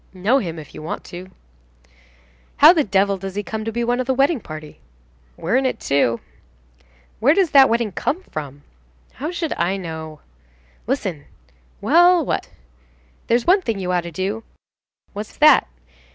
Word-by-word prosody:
"Know 215 +9 +2
him, 170 -8 -5
if 155 -2 -11
you - - -9
want 155 - -5
to." 180 +2 -10 1.3
"How 310 +4 +9
the 320 -4 +2
devil 195 -2 +1
does 195 0 -7
he 205 - -2
come 220 +1 -5
to 225 - -2
be 235 +2 -2
one 245 +1 0
of 255 - -2
the 265 - +1
wedding 275 +2 +2
party?" 155 -5 -10 0.6
"We 170 - -5
are - - +3
in 265 0 +3
it, - - -3
too." 130 -4 +1 1.0
"Where 280 +7 +4
does 380 -5 +2
that 270 -2 +7
wedding 230 -2 0
come 330 - -2
from?" 145 - -8 0.5
"How 290 +7 -5
should 340 -3 -3
I 190 +3 0
know?" 160 -4 -7 0.7
"Listen." 190 - -3 0.6
"Well, 340 - +5
what?" - - -2 0.8
"There's 235 +1 +2
one 380 +3 +4
thing 225 - -2
you 185 -2 -3
ought 180 -1 +1
to 170 0 -8
do." 195 +6 -3 0.7
"What's 205 +1 -8
that?" 305 - +6
215 Hz, 170 wpm, -21 LUFS, 175-270 Hz, 1.3 s, How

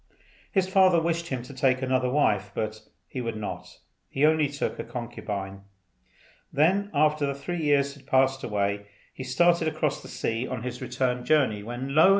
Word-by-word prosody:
His 190 -2 +2
father 190 -2 +5
wished 170 0 -1
him 130 -5 -3
to 130 - -10
take 130 0 +1
another 130 -1 +1
wife, 105 -8 +2
but 110 0 -3 0.3
he 130 - -5
would 115 -2 -3
not. 105 -1 -6 0.3
He 140 +2 +2
only 155 -1 +4
took 140 0 -3
a - - -2
concubine. 105 -5 -5 0.9
Then, 185 +8 +2
after 150 0 +2
the 140 - -2
three 165 +5 -4
years 140 -2 +2
had 140 - -17
passed 135 0 +3
away, 100 -1 -1 0.3
he 130 - -7
started 170 +6 +3
across 150 -2 -1
the - - -11
sea 115 +3 -2
on 125 -3 -4
his 125 0 -5
return 125 0 -1
journey, 130 -8 +2
when 120 +5 -5
lo! 160 +5 +7
135 Hz, 175 wpm, -27 LUFS, 120-155 Hz, 0.9 s, lo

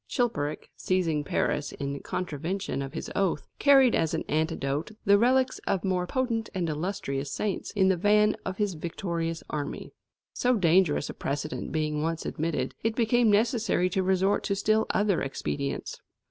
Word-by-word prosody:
Chilperic, 155 - -2
seizing 165 -5 0
Paris 145 +1 -1
in 140 0 -4
contravention 165 -2 -3
of 135 0 -5
his - - -5
oath, 195 -3 0
carried 270 -4 +6
as 160 - +1
an - - -2
antidote 155 -1 -1 0.2
the 200 0 +6
relics 255 +2 +3
of 190 - 0
more 185 -2 0
potent 230 -1 -1
and 180 -3 0
illustrious 150 -4 -3
saints 205 -3 -2
in 195 -2 +3
the 190 - +4
van 210 +3 +4
of 190 0 -4
his 205 -3 0
victorious 165 0 -3
army. 145 -1 -4 0.4
So 250 0 +2
dangerous 175 -6 +3
a - - -10
precedent 145 +2 -4
being 155 -1 -1
once 165 +1 -2
admitted, 160 +1 -2
it 225 0 0
became 235 0 +3
necessary 215 -3 +2
to 190 - +1
resort 190 +1 +2
to 200 - 0
still 215 +2 +2
other 205 -4 +2
expedients. 140 0 -4
185 Hz, 160 wpm, -27 LUFS, 155-210 Hz, 0.4 s, carried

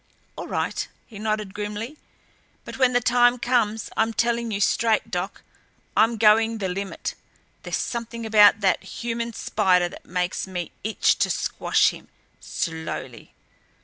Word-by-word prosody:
"All - - -6
right," - - -2 0.2
he 210 -4 -12
nodded, 215 -2 -2
grimly. 210 +6 -5 0.7
"But - - -8
when 255 -1 +4
the 245 - +3
time 245 0 +4
comes 230 -3 0
I'm 225 +1 +1
telling 235 0 0
you 205 -2 -2
straight, 225 +2 +1
Doc, 180 +1 -4 0.5
I'm 225 +1 +3
going 225 +1 +4
the 195 -3 -2
limit. 195 +2 -4 0.5
There's - - -2
something 235 -1 -4
about 210 -1 +6
that 190 -2 +2
human 235 0 -4
spider 185 -5 +2
that - - -13
makes 180 +1 -2
me 180 -2 -5
itch 220 +1 +2
to - - +2
squash - - +2
him - - -13 0.3
slowly." 160 -1 -5
220 Hz, 145 wpm, -24 LUFS, 195-235 Hz, 0.7 s, about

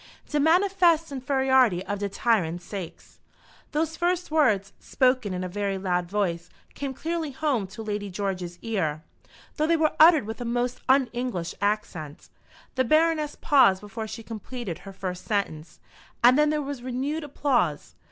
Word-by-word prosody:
"De 295 - 0
manifest 340 0 +3
infairiority 260 -7 +2
of 200 +1 -4
de 200 0 -2
tyrant 190 -6 +1
saix 175 -1 -9 0.2
." - - -28
Those 320 +1 -1
first 355 0 -1
words, 215 -11 +2
spoken 255 -5 +1
in 185 0 -3
a - - -2
very 200 +1 -2
loud 180 -2 -1
voice, 175 -4 -1 0.2
came 275 -2 -5
clearly 325 +1 -3
home 270 -7 -1
to 220 +4 -9
Lady 205 -1 -3
George's 180 -2 -4
ear, 160 -9 -2 0.5
though 310 0 +1
they 335 0 +3
were 310 -1 +2
uttered 315 -5 +7
with 220 +3 -6
a - - -2
most 245 +1 -2
un 265 -1 +5
English 240 -9 -3
accent. 200 -8 -3 0.4
The 260 - +1
Baroness 310 +2 +2
paused 230 -10 +5
before 220 +2 -6
she 225 - -7
completed 225 -4 -6
her 195 - -10
first 185 -2 -6
sentence, 175 -7 -3 0.4
and 245 +2 +7
then 300 +1 +4
there 300 -1 0
was 280 -2 -5
renewed 265 +5 -3
applause. 260 - 0
235 Hz, 160 wpm, -26 LUFS, 195-290 Hz, 0.5 s, uttered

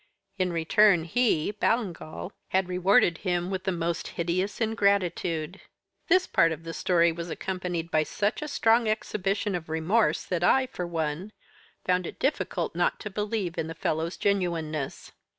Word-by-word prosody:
In 185 -1 +1
return 175 +2 +4
he 185 -2 +1
(Ballingall) 195 -5 -2 0.2
had 190 -1 +1
rewarded 180 -1 +3
him 180 -1 -1
with 190 0 -3
the 190 - +1
most 170 -1 -2
hideous 180 +4 -1
ingratitude. 195 -6 0 0.5
This 370 +2 +4
part 165 0 +3
of 160 0 -5
the 165 0 -6
story 170 -1 +3
was 170 +1 -6
accompanied 180 -2 -3
by 155 - +3
such 205 - -1
a 300 - -3
strong 230 -4 +3
exhibition 205 -1 -1
of 170 -3 -4
remorse 175 +8 +1
that 175 -2 -2
I, 260 +9 +4
for 180 -9 -5
one, 165 +4 -3 0.5
found 180 -1 +1
it - - -8
difficult 270 - -1
not - - 0
to 210 - -6
believe 205 -3 -2
in 160 - -1
the 165 - -6
fellow's 160 +2 -2
genuineness. 165 -7 -1
180 Hz, 155 wpm, -27 LUFS, 165-205 Hz, 0.5 s, return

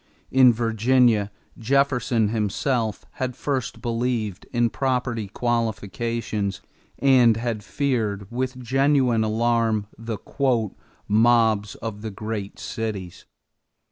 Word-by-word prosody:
In 130 -1 +7
Virginia, 115 -1 +2 0.3
Jefferson 125 -3 +2
himself 110 +1 -1 0.2
had 130 -1 -1
first 130 -4 -3
believed 115 -4 -2
in 120 -1 +1
property 125 -5 -1
qualifications 115 -2 -2 0.4
and 125 -5 +5
had 115 -2 -3
feared 110 -6 -1
with 130 +1 -2
genuine 130 -2 +2
alarm 110 -1 +1
the 115 -1 -4 0.9
"mobs 110 -1 +3
of 105 -2 -6
the 110 - -4
great 105 -1 -5
cities." 105 -6 -5
115 Hz, 95 wpm, -24 LUFS, 110-125 Hz, 0.9 s, In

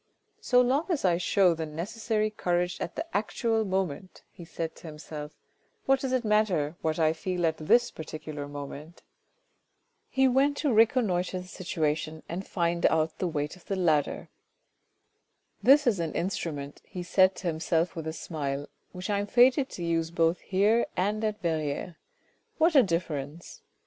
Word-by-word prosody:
"So 250 -1 +4
long 265 +6 +1
as 320 - 0
I 175 -2 +3
show 180 0 +3
the 160 -1 -4
necessary 215 +7 -2
courage 175 -3 -1
at 170 - -4
the - - -3
actual 225 +2 0
moment," 190 -3 -3
he 175 - -12
said 165 0 -5
to - - -11
himself, 150 -1 -8 0.3
" 450 - -42
what 270 0 +3
does 265 -1 -3
it 255 -2 0
matter 195 -8 +2
what 160 -1 -1
I 160 -1 +3
feel 180 +1 -2
at 160 -1 +1
this 240 +10 +3
particular 155 -2 -7
moment? 145 +3 -9 0.5
" - - -48 0.3
He 265 0 +3
went 275 +3 +2
to 285 -5 +1
reconnoitre 210 -6 +2
the 180 - -12
situation 160 -4 -2
and 185 +4 -5
find 170 -1 -1
out 160 0 0
the 185 - 0
weight 150 -2 -3
of 180 - -19
the 195 - -2
ladder. 160 -6 +1 1.3
"This 275 +7 +6
is 220 -7 +2
an 165 -2 -3
instrument," 155 -6 -3
he 180 - -7
said 185 +1 +4
to - - -9
himself 165 +2 0
with 160 -2 -5
a - - -1
smile, 145 -4 -4
" - - -45
which 180 0 -6
I 200 - +1
am 205 - -3
fated 255 +4 +4
to 175 - -7
use 165 -1 0
both 165 +1 +1
here 205 +5 +2
and 210 +4 0
at 215 -1 -1
Verrieres. 160 0 -2 0.6
What 330 +1 +4
a 280 - +8
difference 165 - -3
175 Hz, 175 wpm, -28 LUFS, 160-215 Hz, 1.3 s, a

